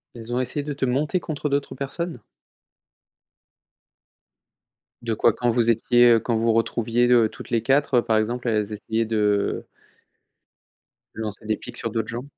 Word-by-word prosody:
Elles 115 Hz, 0 st, -8 dB
ont 120 Hz, -, 0 dB
essayé 130 Hz, +3 st, -2 dB
de 145 Hz, +1 st, -4 dB
te 135 Hz, -1 st, -1 dB
monter 145 Hz, +7 st, 0 dB
contre 150 Hz, -3 st, -4 dB
d'autres 140 Hz, 0 st, -1 dB
personnes? 140 Hz, +2 st, -5 dB, 2.8 s
De 115 Hz, -1 st, -2 dB
quoi? 110 Hz, +1 st, +3 dB
Quand 120 Hz, +2 st, -1 dB
vous 120 Hz, 0 st, +2 dB
étiez, 120 Hz, +2 st, +4 dB
heu, 115 Hz, -, +4 dB
quand 115 Hz, +1 st, -1 dB
vous 115 Hz, 0 st, +2 dB
retrouviez, 115 Hz, +1 st, +1 dB
heu, 120 Hz, -2 st, +5 dB
toutes -, -, -11 dB
les 115 Hz, -2 st, +1 dB
4 135 Hz, +1 st, +3 dB
par 110 Hz, -1 st, +1 dB
exemple, 120 Hz, +3 st, -1 dB
elles 110 Hz, -2 st, 0 dB
essayaient 110 Hz, +2 st, -2 dB
de 105 Hz, -2 st, 0 dB, 1.5 s
lancer 110 Hz, 0 st, -5 dB
des 110 Hz, 0 st, 0 dB
pics 120 Hz, 0 st, -10 dB
sur 115 Hz, -, -3 dB
d'autres 110 Hz, 0 st, -2 dB
gens? 120 Hz, +2 st, -5 dB
120 Hz, 160 wpm, -23 LUFS, 110-125 Hz, 2.8 s, heu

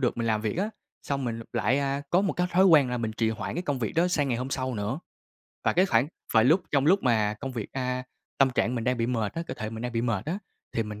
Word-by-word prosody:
được 125 Hz, -, +1 dB
mình 115 Hz, -1 st, -1 dB
làm 110 Hz, -1 st, +1 dB
việc 110 Hz, +6 st, -2 dB
á, 210 Hz, +4 st, 0 dB, 0.3 s
xong 140 Hz, -1 st, -2 dB
mình 115 Hz, -1 st, -3 dB
lại, 130 Hz, +6 st, +2 dB
a, 140 Hz, 0 st, -1 dB
có 180 Hz, -, +4 dB
một 195 Hz, -, +1 dB
cái 180 Hz, -, 0 dB
thói 185 Hz, +2 st, +5 dB
quen 150 Hz, -8 st, +6 dB
là 125 Hz, -, -1 dB
mình 110 Hz, -1 st, -2 dB
trì 115 Hz, -2 st, +2 dB
hoãn 110 Hz, -, -4 dB
cái 175 Hz, -, -2 dB
công 145 Hz, -6 st, -1 dB
việc 110 Hz, -, -2 dB
đó 170 Hz, +2 st, +2 dB
sang 145 Hz, -6 st, +1 dB
ngày 120 Hz, -, 0 dB
hôm 130 Hz, +2 st, -4 dB
sau 130 Hz, -1 st, -2 dB
nữa. 105 Hz, +8 st, -2 dB, 0.6 s
Và -, -, +3 dB
cái 185 Hz, +2 st, +4 dB
khoảng 120 Hz, -4 st, +3 dB, 0.3 s
và 110 Hz, -, +7 dB
lúc 160 Hz, +10 st, +4 dB
trong 140 Hz, -1 st, +2 dB
lúc 190 Hz, +5 st, +4 dB
mà 110 Hz, -4 st, +2 dB
công 135 Hz, -2 st, -4 dB
việc, 115 Hz, -5 st, -4 dB
a 125 Hz, -1 st, -2 dB, 0.4 s
tâm 135 Hz, -1 st, +5 dB
trạng 125 Hz, 0 st, 0 dB
mình 115 Hz, -2 st, -2 dB
đang 125 Hz, 0 st, +1 dB
bị 115 Hz, 0 st, 0 dB
mệt 115 Hz, -4 st, -1 dB
á, 165 Hz, -, -2 dB
cơ 130 Hz, -, -4 dB
thể 110 Hz, -3 st, -5 dB
mình 115 Hz, 0 st, -6 dB
đang 125 Hz, -1 st, -3 dB
bị 115 Hz, -, 0 dB
mệt 115 Hz, -5 st, -1 dB
á, 175 Hz, +5 st, -1 dB, 0.3 s
thì 115 Hz, -, 0 dB
mình 105 Hz, -1 st, -7 dB
125 Hz, 295 wpm, -27 LUFS, 115-145 Hz, 0.6 s, và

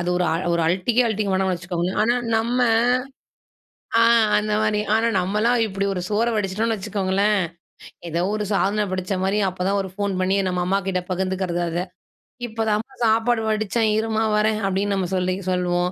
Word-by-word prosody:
அது 175 Hz, +1 st, -1 dB
ஒரு 180 Hz, -, +1 dB, 0.3 s
ஒரு 170 Hz, -, +1 dB
அலட்டிக்கே 190 Hz, +8 st, +2 dB
அலட்டிக்க 210 Hz, -3 st, -1 dB
வேணாம்னு 190 Hz, -1 st, +1 dB
வச்சுக்கோங்க. 175 Hz, +1 st, -3 dB
ஆனா 240 Hz, +2 st, +2 dB, 0.2 s
நம்ம 235 Hz, +3 st, 0 dB, 1.4 s
ஆ -, -, +5 dB, 0.4 s
அந்த 210 Hz, 0 st, -1 dB
மாரி 215 Hz, -1 st, +1 dB
ஆனா 225 Hz, +1 st, +2 dB
நம்மலாம் 215 Hz, +6 st, +1 dB
இப்படி 200 Hz, -1 st, -2 dB
ஒரு 180 Hz, -, -3 dB
சோற 220 Hz, +3 st, +1 dB
வடிச்சிட்டோம்னு 215 Hz, +3 st, 0 dB
வச்சுக்கோங்களேன், 200 Hz, 0 st, 0 dB, 0.7 s
ஏதோ 170 Hz, +1 st, -1 dB
ஒரு 215 Hz, -1 st, -1 dB
சாதன 205 Hz, +2 st, +1 dB
படைச்சா 185 Hz, +1 st, -2 dB
மாரி 195 Hz, +2 st, +1 dB
அப்போதான் 185 Hz, +2 st, -1 dB
ஒரு 190 Hz, -, -6 dB
ஃபோன் 200 Hz, -1 st, -2 dB
பண்ணி 190 Hz, +1 st, +1 dB
நம்ம 180 Hz, -1 st, -1 dB
அம்மாகிட்ட 190 Hz, -1 st, 0 dB
பகிர்ந்துக்கிறது 185 Hz, -1 st, -1 dB
அத. 170 Hz, +1 st, -2 dB, 0.7 s
இப்போ 225 Hz, 0 st, -5 dB
தாமா 220 Hz, +6 st, -2 dB
சாப்பாடு 225 Hz, +1 st, +2 dB
வடிச்சேன் 215 Hz, +1 st, 0 dB
இரும்மா 220 Hz, 0 st, 0 dB
வரேன் 215 Hz, 0 st, +1 dB
அப்படின்னு 195 Hz, +1 st, 0 dB
நம்ப 185 Hz, -2 st, -1 dB
சொல்லி 185 Hz, 0 st, 0 dB, 0.2 s
சொல்லுவோம். 180 Hz, 0 st, 0 dB
200 Hz, 160 wpm, -22 LUFS, 185-215 Hz, 1.4 s, ஆ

